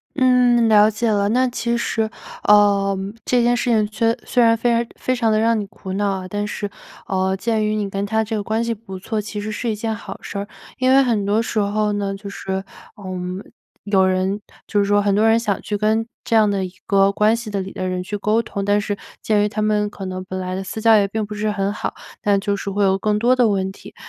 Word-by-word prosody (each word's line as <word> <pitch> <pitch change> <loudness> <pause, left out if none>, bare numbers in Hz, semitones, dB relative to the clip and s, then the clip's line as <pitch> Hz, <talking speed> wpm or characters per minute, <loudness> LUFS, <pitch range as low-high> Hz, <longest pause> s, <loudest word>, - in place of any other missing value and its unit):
嗯， 250 -3 +4
了 210 0 +6
解 225 +2 -1
了。 200 -1 +2
那 255 +4 +3
其 235 -1 -1
实， 225 -1 0 0.4
呃， 200 -1 +4 0.3
这 250 -1 +2
件 240 +1 +3
事 245 0 0
情 215 -2 +3
虽 225 +2 +1
虽 245 -2 +3
然 230 0 +5
非 230 +2 -1
常 235 0 +2
非 255 - 0
常 230 -3 +1
地 215 - +3
让 225 0 +2
你 205 - -3
苦 195 -1 -9
恼 205 +1 0
啊， 185 - -7
但 205 +2 -2
是， 205 0 -4 0.4
嗯， 190 0 0
鉴 220 0 0
于 215 0 0
你 205 -2 -2
跟 195 +1 -2
他 220 +2 +1
这 220 +1 -3
个 205 - -2
关 220 +2 -1
系 230 0 -1
不 195 -3 -9
错， 215 +3 -3
其 210 0 -5
实 215 +1 -4
是 225 +2 -2
一 - - -2
件 220 +1 -3
好 200 -2 -9
事 - - -7
儿。 200 - -4 0.3
因 255 0 +2
为 270 +1 +7
很 230 -6 +1
多 210 +3 +2
时 230 - -4
候 210 +1 0
呢， 200 -1 -2
就 200 +1 -8
是， 190 -1 -4 0.3
嗯， 185 -1 -5 0.4
有 195 -2 +3
人 185 +2 0 0.3
就 205 - +1
是 200 - +3
说 205 +1 +3
很 200 -1 +1
多 215 +2 +4
人 225 +1 +4
想 210 -4 -1
去 210 - -2
跟 215 +2 +1 0.2
这 230 - 0
样 215 -2 +5
的 195 -1 -1
一 185 - -5
个 195 0 +4
关 210 +2 +3
系 230 -2 -6
里 195 -2 -3
的 185 -2 -4
人 185 0 -2
去 200 +3 -5
沟 210 +2 +1
通， 200 - -4
但 205 +1 +2
是 205 0 -2 0.3
鉴 210 -2 +2
于 210 - +1
他 215 +1 -2
们 210 -1 +1
可 195 -1 -8
能 185 0 -5
本 185 0 -5
来 185 0 -4
的 190 +1 -3
私 190 +3 -6
交 225 0 +5
也 205 -2 +4
并 220 +2 -2
不 - - -17
不 - - -5
是 210 +1 -1
很 200 -1 -1
好， - - -3 0.3
但 200 -1 +2
就 200 0 -1
是 200 - -5
会 200 +1 0
有 195 0 +2
更 210 0 +1
多 240 +4 +3
的 245 -2 +4
问 190 -1 0
题。 - - -14
210 Hz, 275 characters per minute, -20 LUFS, 200-225 Hz, 0.4 s, 为